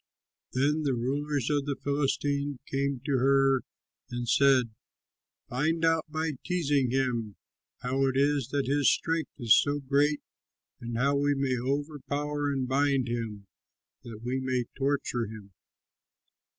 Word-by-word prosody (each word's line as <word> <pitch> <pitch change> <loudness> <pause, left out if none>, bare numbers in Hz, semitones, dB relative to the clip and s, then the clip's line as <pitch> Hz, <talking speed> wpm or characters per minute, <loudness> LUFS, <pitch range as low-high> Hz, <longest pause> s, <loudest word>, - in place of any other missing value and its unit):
Then 145 +4 +2
the 140 -4 0
rulers 140 +3 -1
of 145 -1 0
the 140 - 0
Philistines 140 0 -1
came 140 -1 -1
to 140 -3 +1
her 135 0 +4 0.5
and 120 0 -4
said, 130 -3 +4 0.8
"Find 160 +6 0
out 165 -1 +2
by 160 +1 -1
teasing 145 -8 +1
him 120 -5 -1 0.5
how 135 +2 +1
it 130 0 0
is 140 -2 +2
that 140 0 -1
his 140 +1 +3
strength 165 -1 -1
is 120 -5 +5
so 145 0 +2
great 145 +2 +1 0.6
and 115 -1 -5
how 140 +4 +2
we 145 0 +2
may 135 -2 0
overpower 145 +2 -2
and 135 -2 -1
bind 135 -1 +2
him 110 -4 -4 0.6
that 110 -2 -9
we 125 +2 -1
may 130 -2 -1
torture 135 -4 -1
him. 105 -2 -10
140 Hz, 135 wpm, -28 LUFS, 125-145 Hz, 0.8 s, is